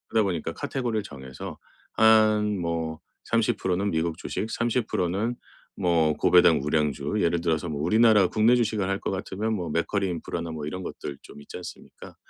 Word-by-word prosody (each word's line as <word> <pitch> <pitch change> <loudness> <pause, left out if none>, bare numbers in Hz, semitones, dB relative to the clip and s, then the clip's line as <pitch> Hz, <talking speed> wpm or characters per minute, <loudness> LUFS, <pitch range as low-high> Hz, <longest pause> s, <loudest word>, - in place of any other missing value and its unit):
그러다 110 - +5
보니까 90 -6 -2
카테고리를 120 -5 -2
정해서 65 -5 -9 0.4
한 110 -2 +4
뭐 80 -2 -3 0.3
30% 115 -5 +1
는 100 +2 0
미국 80 0 -1
주식 105 +4 -4
30% 115 -6 -1
는 110 +7 -1 0.4
뭐 80 -3 +2
고배당 85 -1 +5
우량주 75 +1 -1
예를 85 0 +2
들어서 85 0 0
뭐 75 -2 -4
우리나라 105 +2 +5
국내 110 +5 +3
주식을 110 -5 0
할 95 0 -1
것 - - -3
같으면 95 +3 -3
뭐 90 -5 -4
맥쿼리 95 +5 0
인프라나 85 -1 -4
뭐 75 -2 -5
이런 90 +5 -5
것들 70 -5 -6
좀 - - -13
있지 70 - -11
않습니까? 90 - -11
90 Hz, 335 characters per minute, -26 LUFS, 80-110 Hz, 0.4 s, 그러다